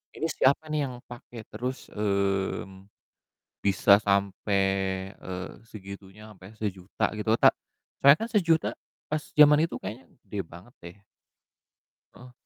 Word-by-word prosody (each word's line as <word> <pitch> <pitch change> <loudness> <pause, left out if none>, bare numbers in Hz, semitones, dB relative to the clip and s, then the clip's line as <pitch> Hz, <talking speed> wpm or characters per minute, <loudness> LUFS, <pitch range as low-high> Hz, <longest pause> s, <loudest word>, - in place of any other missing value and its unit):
ini 160 - -2
siapa 150 +4 +2
nih 150 -3 0
yang 125 - -7
pake, 120 -1 -11
terus, 130 +2 -5
mmm, 100 -1 -2 0.8
bisa 100 0 +2
sampe, 100 0 0 0.6
eee, 95 0 -7 0.2
segitunya, 100 0 -11
sampe 95 -1 -16
sejuta 100 -3 -2
gitu, 105 +1 -3
ta - - +8 0.5
soalnya 140 +2 +8
kan - - -9
sejuta 165 -6 +3 0.4
pas 155 0 -2 0.2
jaman 150 0 +7
itu - - -6
kayaknya 120 +5 -8 0.2
gede 105 - -6
banget 90 +8 -14
deh. 85 +2 -11 1.2
Heeh? 125 0 -14
105 Hz, 125 wpm, -27 LUFS, 95-130 Hz, 1.2 s, ta